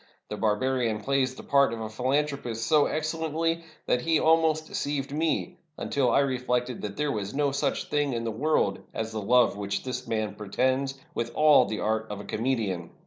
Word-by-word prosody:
The - - -3
barbarian 110 +1 0
plays 130 +2 0
the - - -10
part 140 -3 +3
of 115 - -4
a 110 - -4
philanthropist 125 0 -1
so 150 -2 +4
excellently 160 +1 -1 0.2
that 125 - +1
he 165 +2 +2
almost 160 -1 +3
deceived 140 -3 -3
me, 165 +3 -1 0.2
until 135 -3 0
I 120 - +4
reflected 125 -2 -1
that 100 -1 -5
there 150 -1 0
was 105 0 -4
no 145 -1 +2
such 140 0 -1
thing 145 -2 0
in 115 -1 -2
the 115 - -2
world 115 -4 +1 0.2
as 110 0 -3
the 110 -1 -3
love 125 +3 +4
which 100 -1 -3
this 125 -1 -5
man 110 -2 -1
pretends, 130 +6 0 0.2
with 115 0 -3
all 150 -1 +6
the 110 - -4
art 110 +1 0
of 105 -1 -5
a - - -7
comedian. 105 -8 -1
130 Hz, 190 wpm, -27 LUFS, 110-145 Hz, 0.2 s, all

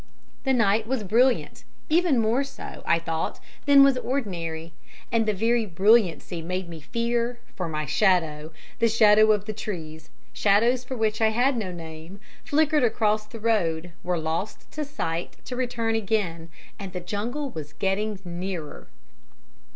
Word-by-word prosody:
"The 265 - +3
night 220 -2 +2
was 255 -3 -1
brilliant, 240 +6 +2 0.2
even 325 -3 +3
more 230 +4 +2
so, 275 -3 -9
I 165 - +4
thought, 165 -1 -3 0.3
than 280 -1 +8
was 275 -2 +4
ordinary, 170 -11 -3 0.4
and 225 -1 +2
the - - +4
very 225 +2 +1
brilliancy 190 -2 +2
made 185 +2 -3
me 165 -2 -9
fear, 235 +5 -1 0.2
for 180 - -3
my 155 -1 -2
shadow, 160 -3 +1 0.3
the 230 - +4
shadow 215 -1 +6
of 205 -1 +1
the 215 - -4
trees, 165 -7 -6 0.2
shadows 230 +5 +3
for 255 0 -6
which 220 0 0
I 220 - +5
had 250 +5 +2
no 210 -6 -3
name, 165 +2 -9 0.2
flickered 300 -1 +2
across 215 -2 +1
the 230 +1 -9
road, 175 -7 0
were 180 0 -1
lost 160 +6 -4
to 305 - -3
sight 175 - -4
to 250 - -5
return 240 -3 -1
again, 195 -7 -1 0.3
and 195 -2 -7
the 180 - -3
jungle 235 +10 -3
was 150 -4 -8
getting 205 +3 -1
nearer. 175 - -5
210 Hz, 155 wpm, -25 LUFS, 170-235 Hz, 0.4 s, than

